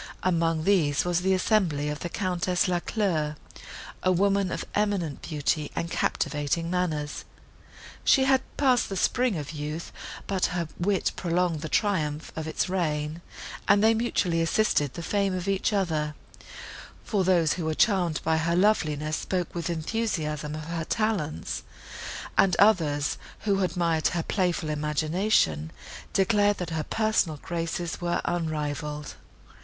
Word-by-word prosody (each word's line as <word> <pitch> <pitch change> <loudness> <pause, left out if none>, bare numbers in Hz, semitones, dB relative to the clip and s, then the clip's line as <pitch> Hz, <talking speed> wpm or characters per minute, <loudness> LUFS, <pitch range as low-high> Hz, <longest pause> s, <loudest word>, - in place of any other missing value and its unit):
Among 165 -3 +1
these, 160 -7 +3
was 175 0 +1
the 190 +1 +3
assembly 185 -7 +1
of 150 -1 -3
the 175 - -4
Countess 180 0 0
Lacleur, 175 -4 0 0.7
a 185 - +3
woman 195 +1 +2
of - - -3
eminent 200 -8 0
beauty 150 -1 -1
and 170 0 -2
captivating 150 +3 -1
manners. 155 -5 -1 0.8
She 270 - +5
had 265 -1 +4 0.2
passed 260 -4 +3
the 195 - -3
spring 245 +1 +1
of 145 -1 -5
youth, 150 +1 -5 0.3
but 190 -2 +1
her 170 -2 -1
wit 190 +2 +1
prolonged 175 -2 0
the 155 - -4
triumph 155 -8 0
of 160 -1 -4
its 160 - -1
reign, 155 -3 -1 0.5
and 200 +1 +5
they 220 +1 +6
mutually 195 -7 +1
assisted 165 -5 +1
the 170 - -5
fame 200 +1 0
of 180 +1 -4
each 195 +2 +1
other; 160 -7 0 0.9
for 200 -3 0
those, 175 -4 +3
who 175 - -4
were 160 0 0
charmed 180 -7 +2
by 160 0 +2
her 165 +1 +1
loveliness, 155 -6 +2
spoke 180 -2 -2
with 170 0 -3
enthusiasm 160 -4 -2
of 155 - -5
her 165 +1 -3
talents; 200 -5 -1 0.8
and 185 -3 +5
others, 160 -9 +3 0.2
who 200 -2 +1
admired 170 -4 +1
her 170 -2 -1
playful 175 -4 0
imagination, 150 - +1 0.4
declared, 205 +1 +3
that 175 -2 -4
her 160 -1 -1
personal 215 -8 +1
graces 165 +2 -3
were 175 0 0
unrivalled. 150 -3 -2
170 Hz, 140 wpm, -27 LUFS, 155-195 Hz, 0.9 s, they